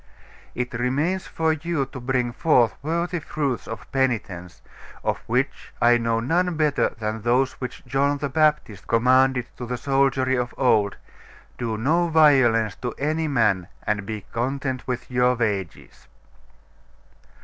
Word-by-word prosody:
It 125 0 -3
remains 145 +10 -1
for 160 -1 0
you 155 -2 -2
to 135 0 -9
bring 125 -1 -1
forth 120 -3 +3
worthy 170 +4 -1
fruits 145 -4 -3
of 115 - -8
penitence; 100 -10 -2 0.4
of - - -1
which 130 +4 -1
I 120 0 +5
know 115 -1 0
none 170 +8 0
better 150 -2 +2
than 110 0 -3
those 125 +4 +2
which 125 - -6
John 140 +3 +1
the 145 0 -2
Baptist 150 -8 0
commanded 125 +2 +3
to 125 - -6
the 125 +1 -3
soldiery 135 -1 +1
of 125 0 -4
old, 105 -6 +2 0.6
"Do 115 -3 -2
no 160 +10 +2
violence 130 - +4
to 125 - -5
any 155 +3 -1
man, 105 - +1 0.2
and 105 -1 0
be 110 -2 -5
content 130 +2 -2
with 125 0 -4
your 125 0 +3
wages." 105 -7 -4
125 Hz, 140 wpm, -23 LUFS, 115-145 Hz, 0.6 s, I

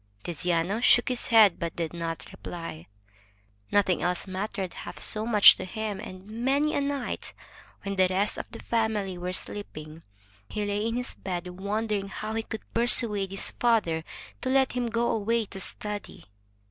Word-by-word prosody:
Tiziano 175 +4 -1
shook 245 0 +5
his 250 -1 -1
head, 220 -6 +6
but 170 -1 -3
did 165 -2 -3
not 165 -1 -5
reply. 165 - -8 0.8
Nothing 195 -3 +2
else 180 0 0
mattered 190 0 -4
half - - -8
so 215 +1 0
much 210 -4 +9
to - - -5
him, 210 +1 -4
and 185 -3 -9
many 265 +8 0
a - - +1
night, 280 -2 -3 0.5
when 200 -1 -4
the 185 0 +5
rest 195 +3 0
of - - -7
the - - -8
family 220 -5 0
were 180 +1 -4
sleeping, 160 -5 -3 0.5
he 210 -1 -2
lay 205 +2 -1
in 230 - -2
his 250 0 -3
bed 180 -2 -5
wondering 205 0 -1
how 215 +2 -5
he 225 - -1
could 220 0 -7
persuade 225 -4 +5
his 195 +1 -2
father 210 -10 +1 0.4
to 260 - -2
let 265 0 +3
him 245 -1 -1
go 235 +1 0
away 225 +1 0
to 195 - -9
study. 210 +2 -5
205 Hz, 170 wpm, -27 LUFS, 185-230 Hz, 0.8 s, much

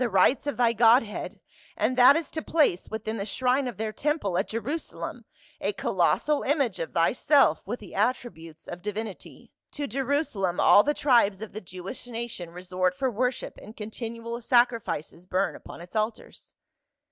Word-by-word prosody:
rights 210 +8 +3
of 285 - -2
thy 235 -1 +3
godhead, 230 -1 +3 0.4
and 255 - +1
that 255 +3 +8
is 325 -2 -2
to 315 - -3
place 295 - +1
within 220 0 -4
the 200 - -3
shrine 255 +4 +1
of 245 - -6
their 215 0 -3
temple 290 - -1
at - - +1
Jerusalem 245 +9 -5 0.3
a - - -1
colossal 300 -1 +1
image 275 - 0
of 165 - -4
thyself 195 - +3
with 240 +4 -3
the 205 - -12
attributes 200 -8 -2
of 175 0 -7
divinity. 210 0 -7 0.2
To 290 -1 -3
Jerusa 275 -1 -1
lem 180 -2 0
all 205 - +7
the 295 +6 0
tribes 235 -8 +3
of 220 0 -8
the 215 - -6
Jewish 185 +7 -8
nation 230 -7 -5
resort 180 +1 -2
for 260 +5 0
wor 250 +3 +1
ship, - - -8
and 215 - -12
continual 230 +2 -6
sacrifices 230 - +1
burn 190 +2 0
upon - - -11
its 175 +5 -13
altars." 215 +1 -3
225 Hz, 170 wpm, -27 LUFS, 195-255 Hz, 0.4 s, that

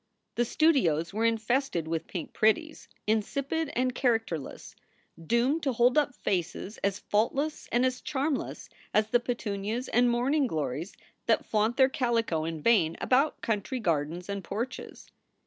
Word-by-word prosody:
The 240 - +1
studios 195 - +2
were 220 +2 0
infested 225 - 0
with 165 0 -2
pink 175 -5 -6
pretties, 310 +9 +1 0.2
insipid 275 +9 -1
and 255 +1 +1
characterless, 225 - -2 0.5
doomed 255 +7 +2
to 270 -4 0
hold 240 +3 +3
up 295 -4 +2
faces 185 +3 -3
as 200 0 0
faultless 270 +11 -1
and 245 +2 +3
as 255 0 -1
charmless 280 0 -2 0.3
as 215 +1 +2
the 240 - +5
petunias 230 0 -3
and 245 +1 +4
morning 260 +4 +2
glories 155 - -3 0.3
that - - +3
flaunt 220 +3 +1
their 265 -1 +6
calico 230 -11 0
in 160 -2 -5
vain 175 -9 +3
about 275 +4 +2
country 225 +4 -2
gardens 170 -2 -1
and 200 -1 -4
porches. 235 +8 -5
230 Hz, 145 wpm, -28 LUFS, 195-260 Hz, 0.5 s, their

